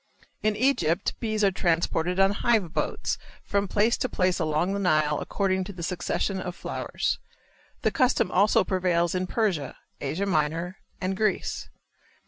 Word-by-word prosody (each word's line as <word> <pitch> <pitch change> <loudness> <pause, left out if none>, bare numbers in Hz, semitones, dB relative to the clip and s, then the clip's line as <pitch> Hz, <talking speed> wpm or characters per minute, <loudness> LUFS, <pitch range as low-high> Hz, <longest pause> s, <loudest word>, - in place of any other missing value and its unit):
In 215 0 +1
Egypt 205 - +1
bees 215 -2 -1
are 195 - +5
transported 170 0 0
on 195 0 +5
hive 205 -5 +1
boats - - -1 0.2
from 200 0 0
place 215 +5 +2
to 255 - -1
place 185 -3 +1
along 160 +3 +1
the 200 - -1
Nile 155 -5 +2
according 190 -2 0
to 200 - -7
the 175 -2 -7
succession 185 +2 -1
of 180 -1 -5
flowers. - - -2 0.6
The - - +3
custom 250 -7 +2
also 200 +3 +4
prevails 175 -3 +1
in 185 0 -1
Persia, 180 - -1 0.2
Asia 160 +8 -1
Minor 165 +1 0 0.2
and 190 +1 -1
Greece. 215 +1 -1
185 Hz, 150 wpm, -26 LUFS, 170-200 Hz, 0.6 s, are